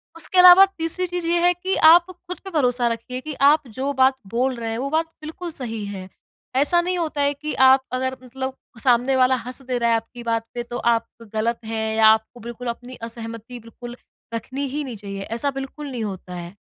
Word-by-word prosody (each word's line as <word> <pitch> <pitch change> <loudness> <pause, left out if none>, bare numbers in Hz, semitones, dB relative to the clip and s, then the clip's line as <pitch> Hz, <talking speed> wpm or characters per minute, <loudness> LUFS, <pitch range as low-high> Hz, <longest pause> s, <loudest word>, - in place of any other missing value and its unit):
उसके 330 +3 +4
अलावा 360 +1 +10
तीसरी 330 +3 -1
चीज़ 355 -1 -4
ये 345 +1 +2
है 355 +1 +4
कि 370 +2 -2 0.2
आप 345 +1 +6
खुद 360 0 -9
पे 390 - -7
भरोसा 250 -6 +1
रखिए 235 +2 -4
कि 310 +2 -6 0.2
आप 295 -2 +2
जो 270 +2 -1
बात 265 0 +4
बोल 250 +5 0
रहे 230 -1 -5
हैं 225 - -3
वो 270 +3 -3
बात 320 +2 +1 0.2
बिल्कुल 325 +3 -7
सही 225 -7 -5
है। 195 -2 -7 0.5
ऐसा 290 +6 +3
नहीं 360 +1 -2
होता 315 -4 -2
है 285 0 +2
कि 300 +2 -5 0.2
आप 265 0 +5
अगर 260 0 -2
मतलब 260 +1 -5 0.3
सामने 250 +1 +3
वाला 260 0 +4
हँस 250 +2 -6
दे 255 -1 -3
रहा 235 -1 +1
है 230 - +4
आपकी 230 +2 -6
बात 230 -1 -1
पे 240 - -4
तो 240 0 -6 0.2
आप 230 - -1 0.3
गलत 225 +2 -1
हैं 220 0 -2
या 220 0 +6
आपको 220 +2 +2
बिल्कुल 240 +1 -8
अपनी 245 +2 -6
असहमति 230 +1 -8
बिल्कुल 240 +1 -10 0.4
रखनी 260 +5 -4
ही 295 +3 -3
नहीं 255 -4 -6
चाहिए। 200 -1 -7 0.2
ऐसा 280 +3 -1
बिल्कुल 270 +2 -7
नहीं 240 -3 -4
होता 190 -3 -6
है। 175 +2 -8
255 Hz, 215 wpm, -22 LUFS, 230-300 Hz, 0.5 s, अलावा